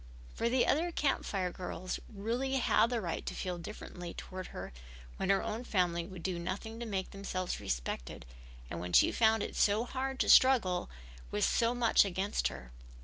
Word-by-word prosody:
For 235 - 0
the 255 0 +3
other 335 +4 +2
Camp 290 -4 0
Fire 185 -3 -1
girls 185 0 -5
really 230 +6 -2
had 245 -3 +3
the 245 -2 0
right 170 -6 -3
to - - -5
feel 180 -2 -3
differently 175 -2 -8
toward 185 0 -7
her - - -8 0.4
when 190 - -2
her 195 0 +3
own 225 +3 -3
family 175 -6 0
would 185 -3 -9
do 180 -2 -2
nothing 200 +6 -5
to 235 - -5
make 190 -3 -3
themselves 185 -2 -3
respected - - -4 0.4
and 85 - -5
when 90 +1 -5
she - - +6
found 220 -1 +3
it - - -5
so 210 +2 +3
hard 265 +1 -3
to - - +1
struggle 225 -9 +5 0.4
with 105 - +1
so 235 +1 +2
much 235 -2 +5
against 195 +1 0
her. - - -8
195 Hz, 185 wpm, -33 LUFS, 180-235 Hz, 0.4 s, she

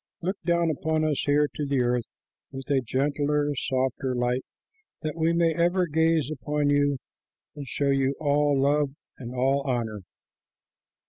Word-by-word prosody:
Look 190 +3 -2
down 170 -1 +2
upon 155 +1 -1
us 155 -3 +1
here 145 +1 +3
on 145 - -1
the 135 -3 +1
earth 120 -1 0 0.4
with 135 0 -8
a 135 -2 +3
gentler, 145 +3 0
softer 130 0 -1
light, 125 +1 0 0.6
that 155 0 -3
we 165 0 +2
may 170 -1 +2
ever 175 +2 +2
gaze 160 -2 +1
upon 150 0 -1
you 145 -1 +2 0.6
and 145 -2 -7
show 140 +3 0
you 135 0 +1
all 145 -1 +2
love 140 0 +2 0.2
and 125 -1 -7
all 135 +2 +2
honor." 120 -6 -2
145 Hz, 150 wpm, -26 LUFS, 130-155 Hz, 0.6 s, here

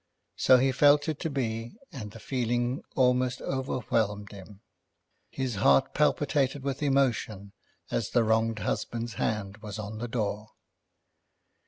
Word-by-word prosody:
So 130 - +6
he 135 +2 +3
felt 145 +2 +4
it 155 -2 -2
to 165 - -2
be, 115 - -3
and 110 -6 -7
the 115 - -12
feeling 120 0 -1
almost 125 -1 +2
overwhelmed 110 -6 -2
him. 100 0 -12 0.7
His 130 -6 -3
heart 70 -7 +4
palpitated 135 -1 +1
with 140 0 -3
emotion 120 -8 0 0.4
as - - -1
the 120 - +3
wronged 110 0 +1
husband's 115 +2 -3
hand 100 -2 -2
was 105 -1 -7
on 110 0 -6
the 120 - -3
door. 110 -2 -3
115 Hz, 135 wpm, -28 LUFS, 105-130 Hz, 0.7 s, So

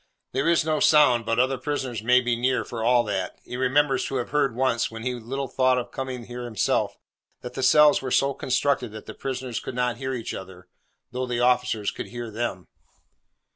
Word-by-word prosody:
There 135 +5 +1
is 170 -2 +3
no 155 -1 +1
sound, 125 -7 +5
but 115 - +1
other 130 +1 +2
prisoners 130 -5 -3
may 125 +3 +4
be 120 -1 0
near 125 +2 0
for 115 -2 -5
all 120 +1 +4
that. 95 -4 -3
He - - -7
remembers 135 +1 +2
to 135 - -4
have 125 -2 -3
heard 140 -5 +1
once, 125 -2 +1
when 115 0 -8
he 125 0 -1
little 130 +3 -4
thought 130 -1 +2
of 125 - -4
coming 130 -2 -5
here 120 +1 -7
himself, 115 -4 0 0.4
that 125 - -7
the - - -4
cells 150 +3 +6
were 130 - -4
so 140 +2 +2
constructed 130 -3 0
that 110 - -9
the - - -8
prisoners 130 -3 -4
could - - -7
not 125 -2 0
hear 130 +1 -3
each 115 - -5
other, 95 -1 -9 0.4
though 125 +1 -3
the 120 -1 -1
officers 125 -4 +2
could - - -7
hear 120 -2 -7
them. 105 -5 -4
125 Hz, 210 wpm, -25 LUFS, 120-130 Hz, 0.4 s, cells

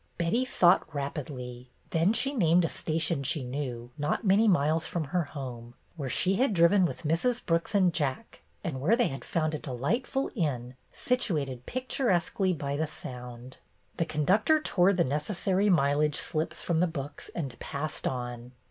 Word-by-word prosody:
Betty 180 +10 +1
thought 175 -8 +3
rapidly. 130 -4 -5 0.2
Then 165 +4 +3
she 250 +5 0
named 175 - +4
a - - -1
station 155 -1 -1
she 140 +1 -1
knew, 125 -2 -5
not 145 +9 0
many 205 +3 +5
miles 160 -3 +2
from 170 - -2
her 165 +3 -1
home, 120 -5 -8 0.2
where 140 -5 -4
she 190 +9 +2
had 250 -4 +2
driven 180 +3 +5
with 170 - -4
Mrs. 170 +11 0
Brooks 170 +4 0
and 185 -4 +4
Jack 145 - -3 0.2
and 150 -9 -3
where 185 +11 +4
they 240 0 +2
had 135 - -6
found 160 -4 -1
a 155 - -2
delight 150 - -2
ful 270 0 -1
inn, 130 - -2 0.2
situated 150 - -1
picturesquely 215 -7 0
by 140 -4 -2
the 160 +1 0
Sound. 125 -3 -9 0.4
The 165 - +1
conductor 190 - +3
tore 190 -10 +3
the 180 -3 +2
necessary 185 +7 0
mileage 150 -3 +3
slips 155 +1 -3
from 170 -2 +1
the 180 - +3
books 145 -3 -6
and 135 -8 -4
passed 155 +2 -3
on. 120 -1 -5
160 Hz, 165 wpm, -29 LUFS, 140-185 Hz, 0.4 s, many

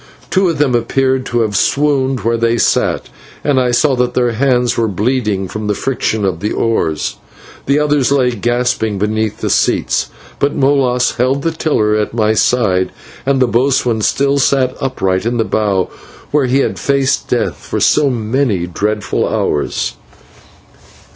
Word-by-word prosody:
Two 190 -2 +3
of 165 - -2
them 140 -3 +1
appeared 130 +2 0
to 120 0 0
have 105 -2 -1
swooned 135 +2 +1
where 115 +1 0
they 115 0 +1
sat, - - +1 0.4
and 140 -3 +2
I 125 -1 +1
saw 130 +3 +2
that 125 0 0
their 120 -1 +2
hands 125 0 +1
were 115 -1 +1
bleeding 105 -1 -1
from 110 +2 -5
the 105 - 0
friction 110 -5 -1
of 90 -4 -1
the 105 +4 -2
oars. 80 -9 -1 0.5
Three 140 +2 +3
others 145 -3 +1
lay 130 -3 +3
gasping 120 -2 -1
beneath 110 +1 -2
the - - -1
seats, - - +1 0.3
but 140 - 0
Molas 135 -3 +1
held 130 +3 +1
the 165 - +1
tiller 125 -10 0
at 105 +1 -2
my 110 -1 +2
side, 105 -5 +1 0.4
and 135 -1 +2
the 130 - +4
boatswain 120 -2 +1
still 140 +5 +1
sat 130 -2 +1
upright 95 -9 -1
in 120 +2 -1
the 115 - +2
bow 100 -5 0 0.4
where 145 -3 +2
he 135 +2 +2
had - - -2
faced 140 -1 0
death - - 0
for - - -4
so 145 - +3
many 115 -5 -1
dreadful 105 +4 -2
hours. 75 - -1
120 Hz, 165 wpm, -15 LUFS, 110-135 Hz, 0.5 s, the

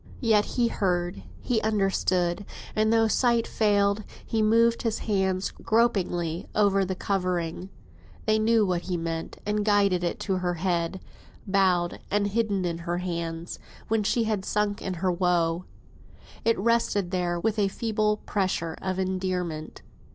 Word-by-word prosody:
Yet 220 -4 +4
he 240 -1 +4
heard, 175 - -1 0.2
he 230 -3 0
understood, 195 -3 +1 0.3
and 215 0 +2
though 225 0 +4
sight 235 0 +2
failed, 205 -1 +2 0.2
he 225 - 0
moved 230 +2 +4
his 225 -2 -1
hand 190 -3 0
gropingly 180 -7 +1
over 200 -2 +3
the 190 0 -2
covering. 180 -2 -2 0.6
They 215 0 +3
knew 220 0 +3
what 180 -2 0
he 180 0 -3
meant, 165 -1 -4
and 210 0 0
guided 200 -4 +3
it 175 - -2
to 190 -3 0
her 180 -1 -1
head, 175 +1 -1 0.4
bowed 185 -3 +2
and 205 +1 +1
hidden 205 -2 0
in 170 -1 -2
her 170 +1 -2
hands, 170 -2 -4 0.3
when 220 0 +2
she 220 +3 +1
had 215 -3 -1
sunk 205 0 -1
in 185 - -3
her 180 +2 0
woe. 175 -1 +1 0.8
It 230 0 +3
rested 205 -3 +1
there, 175 -2 0
with 215 +3 0
a 200 - +3
feeble 215 0 0
pressure 180 -5 -1
of 190 -1 -2
endearment. 185 -4 -3
195 Hz, 150 wpm, -26 LUFS, 175-215 Hz, 0.8 s, Yet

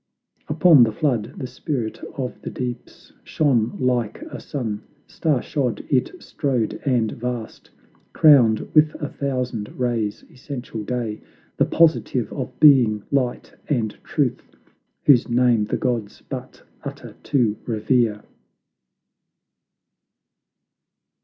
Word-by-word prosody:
Upon 155 -2 +6
the 115 -2 +5
flood 115 -3 -1
the - - -4
Spirit 130 -2 -4 0.2
of 130 -2 -4
the - - -5
Deeps 125 -1 -7
Shone 125 -7 +1
like 125 -4 -1
a - - -6
sun; 115 -7 -4 0.2
star 150 -6 -1
shod 130 -6 -2
it 130 -3 +2
strode 130 -7 -2
and 120 -5 +1
vast, 120 -2 -6 0.4
Crowned 125 -8 +6
with 155 0 +4
a 145 -2 -4
thousand 125 -6 -3
rays; 115 -4 -1
Essential 125 -4 -7
Day, 115 -2 -3 0.4
The - - +4
positive 155 -7 +2
of 130 -3 -6
being, 120 -8 +6
Light 130 -3 -1 0.2
and 115 -7 0
Truth, - - -2 0.5
Whose 130 -5 +5
name 120 -3 +3
the - - -2
gods 120 -5 -3
but - - -8 0.2
utter - - -8
to 120 -7 +2
revere! 110 -1 +1
125 Hz, 115 wpm, -22 LUFS, 110-140 Hz, 0.5 s, Upon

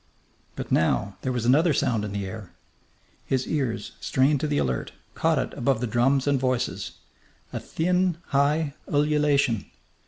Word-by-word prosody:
But - - -6
now 100 +5 +1
there 130 - -1
was 120 -2 -2
another 150 +5 +4
sound 110 -4 +1
in 105 - -4
the 100 -1 -3
air. 95 -1 -8 0.7
His 130 -1 -1
ears, 130 -7 -2
strained 135 +2 +2
to 155 - -1
the 145 -1 0
alert, 65 -2 -1 0.2
caught - - +1
it - - -2
above 125 -1 0
the 125 - -1
drums 125 +4 +2
and 140 -2 +2
voices 130 -1 -1 0.6
a - - -2
thin, 180 +1 0
high 145 +1 +2 0.2
ululation. 145 -6 +2
135 Hz, 155 wpm, -25 LUFS, 115-150 Hz, 0.7 s, another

